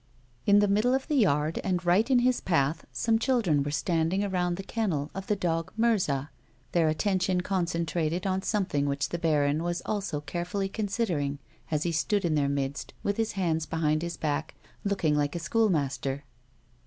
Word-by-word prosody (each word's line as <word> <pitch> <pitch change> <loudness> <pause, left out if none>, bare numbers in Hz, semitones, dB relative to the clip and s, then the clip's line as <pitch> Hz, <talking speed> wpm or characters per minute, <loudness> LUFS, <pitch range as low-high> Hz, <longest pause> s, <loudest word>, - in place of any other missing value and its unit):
In 200 0 +7
the 205 0 +5
middle 215 +6 +3
of 265 - -2
the - - -1
yard, 155 - +2
and 180 -2 -1
right 195 +8 +3
in 260 - +5
his 255 -1 +2
path, 160 -2 0
some 225 - +1
children 225 - +2
were 140 - -2
standing 165 +5 0
around 180 -3 0
the 195 - -5
iicnnel 180 -10 -2
of 195 0 -6
the 210 - +2
dog 165 -3 -1
Mirza, 180 - +1 0.4
their 170 -2 +3
attention 185 +3 +1
concentrated 170 -2 -1
on 190 0 0
something 185 -10 0
which 140 0 -1
the 170 - -3
baron 150 -2 +2
was 175 0 -2
also 200 -8 -2
carefully 175 +6 -3
considering 195 - -1 0.3
as 155 -1 0
he 170 - 0
stood 190 +5 +1
in 165 - +1
their 145 -2 +2
midst 140 0 -3
with 200 - 0
his 225 -1 0
hands 165 -5 0
behind 155 -1 +1
his 170 0 -4
back, 155 0 -2 0.3
looking 190 -7 +1
like 145 +1 0
a - - -1
school 220 +7 +2
master. 140 -3 -1
175 Hz, 180 wpm, -28 LUFS, 150-200 Hz, 0.4 s, In